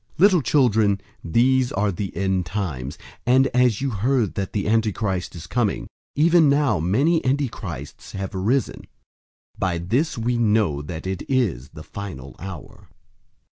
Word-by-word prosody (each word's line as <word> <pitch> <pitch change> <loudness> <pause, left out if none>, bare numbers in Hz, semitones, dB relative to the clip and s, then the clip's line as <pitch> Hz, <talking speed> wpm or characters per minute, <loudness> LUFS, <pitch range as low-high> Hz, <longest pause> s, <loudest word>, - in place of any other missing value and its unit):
002:018 - - -28
Little 185 -2 +6
children, 110 -7 +3 0.2
these 125 +8 +2
are 100 +1 +1
the 95 +2 -5
end 95 -2 +1
times, 80 -9 -4 0.3
and 130 +2 +4
as 125 -4 +2
you 135 -1 0
heard 115 0 +1
that 95 -2 -3
the 100 -2 -2
Antichrist 105 -5 0
is 85 -1 -8
coming, 110 +1 -1 0.3
even 165 0 +5
now 140 - +2
many 135 - +2
antichrists 130 - -3
have 95 0 -4
arisen. 110 +8 -1 0.7
By 90 -3 0
this 120 - 0
we 120 +1 0
know 105 -10 +2
that 80 +2 -7
it 95 -1 -3
is 110 - 0
the 75 - -11
final 80 -7 -8
hour. 95 -3 -9
105 Hz, 145 wpm, -23 LUFS, 95-130 Hz, 0.7 s, Little